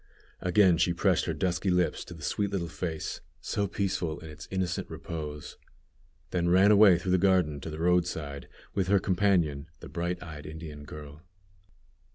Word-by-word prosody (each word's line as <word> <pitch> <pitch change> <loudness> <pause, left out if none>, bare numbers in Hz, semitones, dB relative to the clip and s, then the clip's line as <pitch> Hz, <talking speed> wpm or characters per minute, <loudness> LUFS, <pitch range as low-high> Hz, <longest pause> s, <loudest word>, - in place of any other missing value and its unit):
Again 90 -2 +4
she 85 0 +2
pressed - - +2
her - - -1
dusky 95 +1 0
lips 90 -1 +1
to 85 - -9
the 80 - -11
sweet 100 +6 0
little 95 -4 -2
face, 80 -1 -4 0.2
so 100 -1 -1
peaceful 90 -5 -2
in 80 - -9
its 75 - -10
innocent 95 -2 -2
repose, 75 -3 -6 0.7
then 85 -1 +1
ran 95 +4 +6
away 100 -4 +7
through 90 +2 -2
the 95 - +4
garden 90 -6 +3
to 75 - -6
the 75 - -6
roadside, 80 -5 0 0.3
with 95 -2 0
her 100 +1 +5
companion, 90 -7 +1
the - - -10
bright 85 +3 -3
eyed 75 -3 -8
Indian 75 -2 -8
girl. 75 0 -10
85 Hz, 170 wpm, -29 LUFS, 75-95 Hz, 0.7 s, away